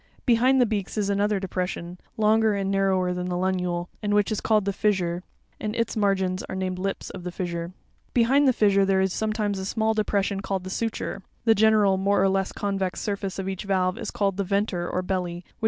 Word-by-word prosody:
Behind 255 +2 +4
the 250 - +5
beaks 210 -2 -3
is 200 -1 +1
another 200 0 +1
depression, 180 -2 -4 0.2
longer 220 0 +3
and 195 -1 -1
narrower 190 -2 +2
than 180 0 -3
the 180 - -1
funule, 180 -1 -1
and 205 -1 0
which 205 +2 +2
is 215 - -1
called 215 -3 +2
the 200 - 0
fissure 185 -4 +1
(f}, 180 - -10 0.4
and 215 +1 -3
its 230 -1 -1
margins 190 -3 +1
are - - -4
named 185 -1 -2
lips 195 +1 -3
of 180 - -8
the 180 - -4
fissure 175 -2 -3
(Uf). 180 +2 -18
Behind 265 +4 +4
the - - +6
fissure 200 -4 +3
there 195 0 +2
is 190 -1 +1
sometimes 215 -2 -1
a - - -4
smali 220 +3 0
depression 200 -2 0
called 195 -1 -3
the 185 - -6
suture 225 +2 -2
(s). - - -13 0.2
'The 225 - +6
general 210 -2 +4
more 200 +1 +2
or 195 - +4
less 195 0 0
convex 195 -2 -2
surface 200 -2 -3
of 190 -1 -3
each 195 +1 -4
valve 185 -2 +1
is - - -4
called 195 -2 -1
the 200 - 0
"'venter," 195 -2 -1
or 185 - -1
belly, 180 -2 -2
which 175 - -9
Fig. - - -31
195 Hz, 230 wpm, -25 LUFS, 185-210 Hz, 0.4 s, the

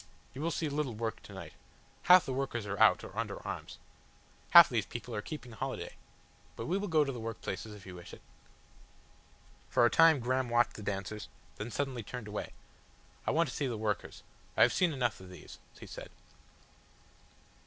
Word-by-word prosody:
"You 135 - -7
will 165 - 0
see 165 -1 -1
little 145 -5 -2
work 115 0 -3
to - - -13
night. 85 -5 -9 0.6
Half 180 -2 +9
the 130 - -3
workers 130 -4 -2
are 100 0 -4
out - - +6
or - - -10
under - - -3
arms. - - -6 0.7
Half 170 -1 +11
these 115 -5 -1
people 120 0 -7
are 105 - -2
keeping 125 0 -8
holiday. 110 - -5 0.6
But 115 - -5
we 175 - 0
will 205 - -3
go 160 -4 +4
to 140 - -2
the 125 - -6
work 115 -1 -5
places 105 +3 -5
if 100 - -13
you 95 - -9
wish 90 -1 -10
it." - - -12 1.5
For 120 - +4
a 120 - +4
time 165 -3 +6
Graham 130 +1 0
watched 120 0 +3
the - - -9
dancers, 100 +1 -4 0.3
then 105 +3 -5
suddenly 135 -1 -2
turned 115 +1 -7
away. 105 0 -5 0.8
"I - - +3
want 165 +1 +3
to 120 - -7
see 140 - -1
the 120 -3 -3
workers. 105 -2 -3 0.3
I - - +8
have - - +4
seen 180 -2 +3
enough 125 -6 -1
of 95 -1 -12
these," 90 - -12 0.2
he - - -9
said. - - -9
120 Hz, 195 wpm, -32 LUFS, 105-140 Hz, 1.5 s, Half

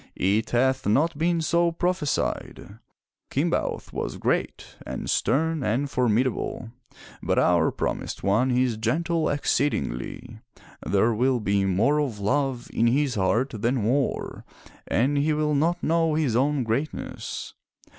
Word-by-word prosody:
"It 100 +4 +1
hath 130 +1 +1
not 145 +10 +2
been 165 +2 +1
so 170 +1 +2
prophe 175 -1 -1
sied. 105 -5 -3 0.5
Kimbaoth - - -1
was - - -4
great - - -2
and - - -6
stem 160 +2 +1
and 125 +6 -1
formidable. 120 -1 0 0.5
But - - 0
our 85 -2 +3
promised - - -4
one 110 +7 +2
is 125 -2 +1
gentle 160 +9 0
exceedingly. 125 - -2 0.4
There 110 +4 +2
will 125 +3 +1
be 100 -2 +1
more 110 +11 +2
of 130 -8 -2
love 130 +3 -1
in 115 - +2
his 135 +2 +2
heart 110 +7 +1
than 115 +2 0
war, 130 +5 -1 0.4
and 140 +5 +1
he 155 +2 +2
will 150 0 0
not 165 +5 +1
know 165 -1 +2
his 145 -8 +1
own 140 +2 +2
greatness." 125 +7 -4
130 Hz, 135 wpm, -25 LUFS, 110-150 Hz, 0.5 s, our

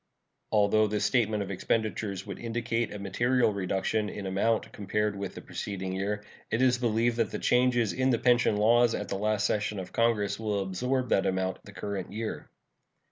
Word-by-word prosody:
Although 110 0 +4
this 105 0 -1
statement 105 -1 +2
of 100 - -6
expenditures 105 -1 -1
would 100 -2 -7
indicate 115 0 -2
a 105 - -5
material 120 +4 +1
reduction 100 +2 -1
in 100 - -6
amount 100 +4 0
compared 105 +1 -1
with 100 -1 -5
the - - -7
preceding 95 -2 -5
year, 100 +2 -2 0.3
it 115 - 0
is 125 -1 +3
believed 115 0 +1
that 115 -4 +1
the - - -4
changes 125 -5 +2
in 130 0 +1
the 120 - +3
pension 120 -3 +3
laws 115 +2 +4
at - - -4
the - - -2
last 105 +1 0
session 105 0 0
of 95 -1 -6
Congress 105 -3 +1
will 105 -3 -1
absorb 125 +7 -1
that 95 - +2
amount 95 0 -1
the 100 - -11
current 100 -1 -5
year. 110 +2 -5
105 Hz, 185 wpm, -29 LUFS, 100-115 Hz, 0.3 s, Although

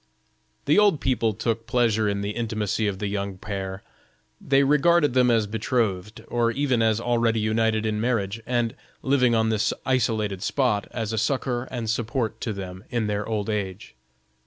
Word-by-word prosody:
The - - +4
old 205 -8 +4
people 115 -4 +1
took 115 +1 -2
pleasure 115 -3 +2
in 100 0 -2
the 100 +1 -2
intimacy 110 -2 -1
of 100 -2 -2
the 105 - -4
young 100 -1 -3
pair; 95 -1 -5 0.6
they 135 0 +3
regarded 150 +1 +4
them 125 -1 +4
as 115 -2 +3
betrothed, 110 -1 -2
or 120 -1 +1
even 130 -1 +1
as 110 -1 +2
already 115 -1 +1
united 110 0 +1
in 105 -1 -1
marriage, 115 -3 -1
and 120 -2 0 0.3
living 125 -3 +3
on 110 0 +2
this 110 -1 +1
isolated 110 -7 0
spot, 110 -2 0
as 115 -2 -4
a 110 - 0
succor 125 +1 -1
and 120 -3 -5
support 115 +1 -2
to 115 - -2
them 95 -2 -7
in 120 -3 -1
their 105 0 -2
old 105 -2 -2
age. 100 - -4
110 Hz, 170 wpm, -25 LUFS, 105-120 Hz, 0.6 s, The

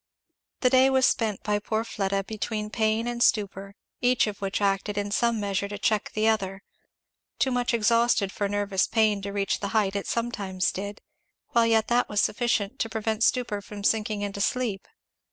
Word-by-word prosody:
The 250 - +3
day 260 0 +6
was 265 -1 +3
spent 220 -5 0
by 210 -1 0
poor 220 +2 -2
Fleda 195 -3 -2
between 215 0 -4
pain 220 0 +1
and 240 0 -3
stupor, 200 -3 +1 0.3
each 250 0 +3
of 205 -2 -6
which 195 0 -1
acted 200 0 0
in 205 0 -2
some 235 +1 +1
measure 200 -1 -1
to 205 0 -6
check 210 0 0
the 215 +1 +2
other; 195 -3 0 0.7
too 265 - +1
much 245 -1 0
exhausted 230 -3 +2
for 200 0 -2
nervous 200 -1 0
pain 215 -3 +2
to 200 +1 -5
reach 200 -1 -1
the 200 - -3
height 200 -2 +1
it 200 - -3
sometimes 200 -6 -1
did, 200 +2 -6 0.5
while 235 -5 +3
yet 225 -1 +3
that 240 +1 +2
was 210 - 0
sufficient 235 +1 0
to 225 - -1
prevent 220 0 -1
stupor 235 -6 +1
from 205 0 -9
sinking 215 -1 0
into 200 0 -4
sleep. 225 -3 -1
210 Hz, 185 wpm, -26 LUFS, 200-230 Hz, 0.7 s, day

